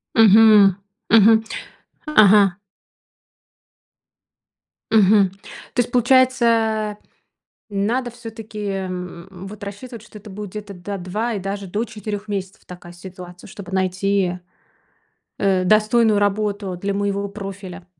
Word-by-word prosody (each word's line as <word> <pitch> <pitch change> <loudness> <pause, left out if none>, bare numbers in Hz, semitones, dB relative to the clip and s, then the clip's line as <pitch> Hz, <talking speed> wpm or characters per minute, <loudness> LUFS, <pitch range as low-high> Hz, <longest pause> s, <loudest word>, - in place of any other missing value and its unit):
Мгм. 215 -3 +6 0.3
Мгм. 220 0 +6 0.6
Ага. 205 -9 +5 2.3
Мгм. 205 -2 +5 0.4
То - - -3
есть, 245 - -5
получается 235 -4 +2 0.7
надо 230 +5 -1
всё-таки, 225 -2 -10
м, 185 -2 -5
м, 185 0 -10
вот 205 +1 -11
рассчитывать, 215 +3 -8
что 215 -1 -13
это 210 - -14
будет, 205 -1 -8
да, 200 +1 -5
2 210 +6 -3
и - - -2
даже 195 +1 -5
до 210 +5 -2
4 210 -2 -7
месяцев 195 -2 -6
такая 175 -1 -12
ситуация, 180 0 -12
чтобы 190 -1 -11
найти, 190 -1 0 1.0
э, 190 -2 +1
достойную 215 +2 +3
работу 205 -2 -1
для 200 +3 -3
моего 200 0 -2
профиля. 195 -2 -9
205 Hz, 110 wpm, -20 LUFS, 190-220 Hz, 2.3 s, Мгм